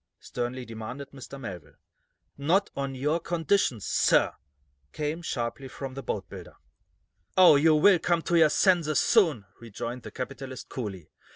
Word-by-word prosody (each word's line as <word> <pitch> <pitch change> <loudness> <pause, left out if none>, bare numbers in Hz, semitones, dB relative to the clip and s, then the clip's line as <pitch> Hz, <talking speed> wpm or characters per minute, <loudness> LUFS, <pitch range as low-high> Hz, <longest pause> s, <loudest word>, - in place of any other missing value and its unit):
sternly 125 +1 -5
demanded 120 +5 -8
Mr. 140 0 -10
Melville. 95 - -8 0.6
"Not 170 +8 +1
on 135 -1 -3
your 150 +5 0
conditions, 165 - 0
sir!" - - +3 0.6
came, 155 +2 -3
sharply, 130 -3 -4
from 135 0 -7
the 135 - -6
boatbuilder. 95 -6 -6 0.8
"Oh, 180 -5 +8
you 155 +2 +5
will 180 +4 +5
come 170 -1 0
to 175 - 0
your 160 -2 +6
senses, 165 -3 +2
soon," 160 - +3
rejoined 120 +2 -6
the 110 - -9
capitalist, 130 +2 -7
coolly. 100 - -6
135 Hz, 135 wpm, -27 LUFS, 120-160 Hz, 0.8 s, Oh